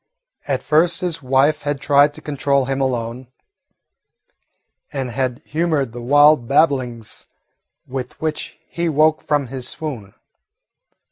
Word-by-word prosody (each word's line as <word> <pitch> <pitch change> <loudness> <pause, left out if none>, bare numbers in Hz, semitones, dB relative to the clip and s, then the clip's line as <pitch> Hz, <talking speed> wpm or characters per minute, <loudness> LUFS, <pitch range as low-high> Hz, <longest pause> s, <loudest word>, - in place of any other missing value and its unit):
At - - -1
first 165 +3 +2
his 175 -4 -2
wife 135 +3 +2
had 145 -1 -2
tried 145 +1 +3
to 155 - -10
control 140 -2 0
him 135 +1 -2
alone, 125 -1 -2 1.6
and 135 -3 -4
had 130 +2 -2
humoured 155 -6 -1
the 120 - -7
wild 145 0 +5
babblings 130 -6 0 0.6
with 130 -1 -6
which 155 -1 -4
he 170 0 -2
woke 155 +1 +3
from 145 -2 0
his 130 0 -5
swoon. 125 -11 -7
140 Hz, 125 wpm, -20 LUFS, 130-150 Hz, 1.6 s, wild